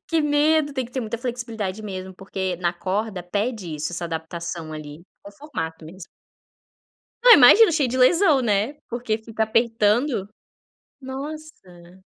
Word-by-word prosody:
Que 330 -1 +1
medo. 295 0 +2
Tem 260 -2 -2
que 240 - -13
ter 260 - -2
muita 225 -1 -4
flexibilidade 230 -5 -4
mesmo, 190 -2 -7
porque, 190 -1 -4
na 175 0 -1
corda, 195 +2 -3
pede 200 -2 -3
isso, 150 +3 -4
essa 170 0 -3
adaptação 165 0 -6
ali 155 +1 -9 0.2
com 200 - -11
formato 165 - -6
mesmo. 175 +2 -11 1.2
Não, - - +9
eu - - +11
imagino, 340 - +7
cheio 295 -5 +1
de 255 - -3
lesão, 305 +2 +4
né. 220 +4 0
Porque 235 -2 -2
fica 220 0 -4
apertando. 225 0 +1 0.7
Nossa. 265 - -10
215 Hz, 150 wpm, -23 LUFS, 180-260 Hz, 1.2 s, eu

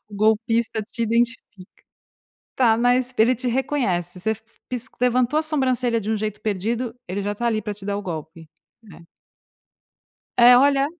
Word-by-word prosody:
O 210 - -12
golpista 220 +1 +1
te 235 +2 -5
identifica. 235 +2 +1 1.1
Tá, 230 -4 +3
mas 245 +1 +1
ele 235 +3 +4
te 250 +2 -2
reconhece, 215 - -1
você 220 - 0
f 220 0 -4 0.3
pis 250 -1 -3
levantou 250 +3 +2
a - - +1
sobrancelha 255 -6 0
de 215 +1 -4
um 220 - +1
jeito 215 0 -4
perdido, 225 +4 -2 0.2
ele 200 +2 -3
já 205 +1 -2
tá 240 +3 -3
ali 215 -2 0
pra 210 - -4
te 200 -1 -10
dar 200 0 -1
o 205 - -4
golpe, 160 -2 -7 0.3
né? 175 -6 -15 1.4
É, 245 +1 +8
olha: 275 +1 +4
230 Hz, 170 wpm, -22 LUFS, 205-250 Hz, 1.4 s, É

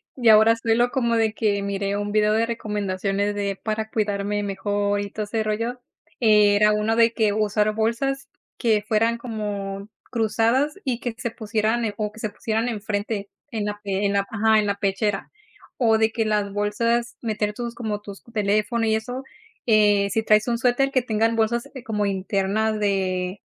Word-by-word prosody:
ya 235 -5 +5
ahora 220 +2 +5
suelo 230 +2 +1
como 235 -3 +1
de 220 -1 +2
que, 210 -3 0
miré 200 0 -2
un 205 0 -3
video 210 0 +3
de 225 +1 +2
recomendaciones 205 -2 -2
de 200 -1 -2
para 220 0 -2
cuidarme 205 -1 -1
mejor, 205 +1 -1
y 200 - -5
todo 215 +1 -4
ese 220 +1 -1
rollo. 230 +4 -2 0.4
Eh, 210 -3 +5
era 210 +1 +5
uno 210 +1 +1
de 230 0 +4
que 215 -3 +2
usar 215 0 +1
bolsas 270 +5 -1 0.3
que 220 -4 +2
fueran 225 +2 +2
como 205 -4 -5 0.2
cruzadas 230 +5 +1
y 250 -3 -1
que 240 - -3
se 235 -2 -3
pusieran 220 +2 -1
o 210 -1 -2
que 220 - -14
se 215 - -2
pusieran 220 +2 -2
enfrente 205 -2 -3 0.2
en 220 -3 -2
la 205 0 -4
en 200 0 0
la 200 0 +1
ajá, 220 0 +3
en 210 - +1
la 200 - 0
pechera 200 0 -1 0.5
o 225 -3 +3
de 220 0 +2
que 225 0 -1
las 210 -2 0
bolsas 230 +4 0
meter 210 -2 -1
tus 235 +1 -5
como 215 -3 -3
tus 200 -1 -10
teléfono 215 +1 0
y 220 0 +2
eso, 245 +4 -4 0.4
eh, 205 -3 +4
si 220 +3 0
traes 215 0 +3
un 235 - +1
suéter 255 +2 +2 0.2
tenga 220 +1 +2
bolsas, 230 +1 0
eh, 260 - -8
como 210 -4 -1
interna 195 +3 0
de 190 -2 -1
215 Hz, 180 wpm, -23 LUFS, 205-230 Hz, 0.5 s, ya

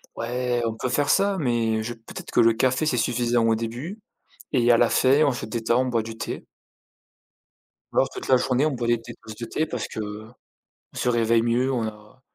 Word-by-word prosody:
Ouais, 120 +1 -1
on 115 - -2
peut 125 - -3
faire 145 +3 +1
ça, 200 -1 +3
mais 115 -4 0
je 120 +1 -4
peut-être 115 0 -10
que - - +2
le 115 -1 +6
café, 130 +6 +1
c'est 135 -5 +1
suffisant 120 0 +1
au 115 - +3
début 125 - -5 0.5
et 120 0 +4
à 115 - +6
la 120 -1 +4
fin, 140 +4 +4
on 140 - +3
se 120 - -5
détend, 115 +3 0
on - - -3
boit 115 -3 0
du 115 0 -8
thé. - - -5 1.5
Ou - - -6
alors - - +4
toute - - -8
la 130 - +5
journée, 130 +3 +1
on - - -1
boit 120 -2 -3
des 120 -1 +2
thés - - -9
des - - -22
tasses 110 - -9
de 115 +1 -6
thé 155 +7 -1
parce 125 -7 -4
qu'on 110 +1 -7 0.6
se - - -1
réveille 115 -1 +3
mieux, 125 +3 +1
on 120 -3 -1
a 105 +4 -14
120 Hz, 225 wpm, -24 LUFS, 115-125 Hz, 1.5 s, le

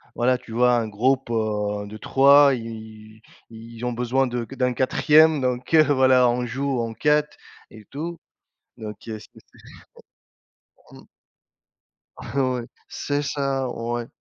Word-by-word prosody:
voilà 125 +1 +2
tu 125 -2 -15
vois? 125 +2 +3
Un 115 -2 0
groupe, 130 +5 0
heu, 105 -2 -2
de 110 +1 -9
3 140 +3 +5
et - - -5
ils 110 -1 -11 0.3
ils 115 +1 -12
ils 120 - -6
ont 125 - -2
besoin 125 +2 0
de 120 -1 -4
d'un 125 -1 0
4e 150 +4 +3
donc 125 +3 -3
heu, 155 -1 +7
voilà 130 -1 +4
on 125 +1 -1
joue 135 +1 -2
en 115 -1 -3
4 150 +3 0 0.3
et 110 -2 -15
tout 165 +4 -6 0.6
donc 105 -2 -8
heu 110 -1 -5
c - - -14 1.7
Mmh. - - -15 1.1
Ouais. 130 -3 -2 0.2
C'est 145 0 -3
ça, 135 -2 -2
ouais. 120 0 -4
125 Hz, 145 wpm, -23 LUFS, 115-135 Hz, 1.7 s, heu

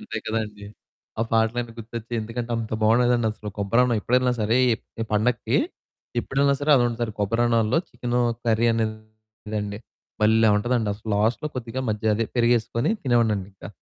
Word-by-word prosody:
అంతే 110 - -5
కదండీ! 105 -2 -3 0.5
ఆ - - +3
పాటలన్నీ 115 +1 +1
గుర్తొచ్చాయి. 115 +1 -6
ఎందుకంటే 115 +2 -5
అంత 110 -1 -4
బావుండేదండి 120 +1 +3
అసలు 110 -1 -8
కొబ్బరి 100 +4 +2
అన్నం 120 -2 +1
ఎప్పుడెళ్ళినా 125 +3 +2
సరే 110 +3 +2 0.4
ఈ - - 0
పండక్కి 115 +3 +1 0.6
ఎప్పుడెళ్ళినా 140 +2 +1
సరే 145 +1 +1
అదొండుతారు. 120 -2 0
కొబ్బరిన్నాల్లో 115 +4 +2
చికెను 125 0 -2 0.3
కర్రీదండి 110 -2 -2 0.4
భల్లే 110 +1 +4
ఉంటదండి. 120 0 0
అసలు 105 +2 -11
లాస్టులో 110 +8 +1
కొద్దిగా 125 +1 -4
మజ్జిగ 110 +1 -1
అదే 115 - 0
పెరిగేసుకొని 120 - +2
తినేవాడినండింకా. 110 -6 0
115 Hz, 130 wpm, -24 LUFS, 110-120 Hz, 0.6 s, భల్లే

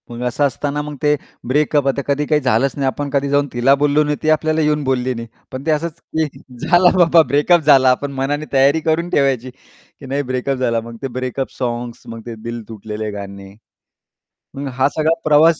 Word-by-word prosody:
मग 120 0 -7
असं 125 +4 -1
असताना 145 +2 -3
मग 150 0 -6
ते 150 0 +3 0.3
ब्रेकअप 145 +1 +2
आता 135 +1 +1
कधी 145 +1 0
काही 150 0 +2
झालंच 130 +1 +2
नाही, 140 - -1
आपण 140 +3 -2
कधी 140 0 0
जाऊन 145 0 +2
तिला 125 +3 +4
बोललो 145 +1 +2
नाही 150 0 -1
ती 155 - +1
आपल्याला 155 0 +2
येऊन 150 -1 +1
बोलली 130 -1 0
नाही. 115 -1 -7 0.2
पण 130 +2 -7
ते 160 - +2
असंच 165 +2 -2 0.2
की 160 -1 +2 0.4
झाला 175 0 +6
बाबा 170 -2 +6
ब्रेकअप 150 +5 +4
झाला. 135 -3 +5
आपण 140 +2 -2
मनाने 140 +3 -2
तयारी 140 +3 +4
करून 165 +2 0
ठेवायची, 135 -5 +1
की 130 - -19
नाही 135 +2 -1
ब्रेकअप 130 +1 -1
झाला 115 -3 0
मग 115 +1 -10
ते 135 - -2
ब्रेकअप 130 +1 -4
सॉन्ग्स 120 -1 -4
मग 115 0 -8
ते 120 -1 -6
दिल 120 0 -5
तुटलेले 110 0 -5
गाणे. 100 -1 -8 1.0
मग 140 +1 -5
हा 130 +2 +2
सगळा 160 +1 +3
प्रवास 155 +1 +5
140 Hz, 200 wpm, -18 LUFS, 125-150 Hz, 1.0 s, झाला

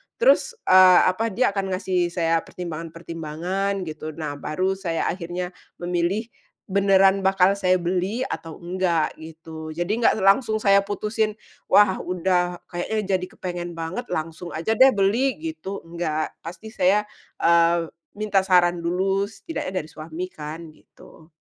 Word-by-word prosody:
terus, - - +3
eee, 185 -1 +7
apa, 225 +5 -2
dia 225 +1 +1
akan 195 -2 -2
ngasih 185 -2 0
saya 165 -1 +1
pertimbangan-pertimbangan 170 +3 -4
gitu, 155 -2 -7
nah 150 -3 -5
baru 185 +7 -1
saya 180 -4 -2
akhirnya 180 0 -5 0.2
memilih 175 +4 -1 0.4
beneran 195 0 +4
bakal 190 -1 +3
saya 185 -1 +3
beli 185 +7 -1
atau 165 -10 -6
enggak 175 -3 0
gitu. 160 0 -9
Jadi 180 +7 -1
enggak 230 - +4
langsung 215 +3 +4
saya 200 -1 +6
putusin, 210 +2 -2 0.3
wah 205 -2 +5
udah, 180 -1 -1
kayaknya 175 +5 -2 0.2
jadi 180 - -4
kepengen 175 -1 -5
banget, 165 +9 -5
langsung 165 +2 -5
aja 165 +7 -1
deh 260 +3 +6
beli 225 +7 +2 0.2
gitu, 200 -11 -7
enggak, 165 -2 -3
pasti 185 +6 -9
saya, 200 0 +3 0.4
eee, 170 0 +3 0.2
minta 210 -1 +1
saran 180 -2 +3
dulu 190 +4 0
setidaknya 195 - -5
dari 155 - -13
suami 165 +4 -6
kan 155 +2 -8
gitu. 155 +1 -19
180 Hz, 135 wpm, -23 LUFS, 165-195 Hz, 0.4 s, eee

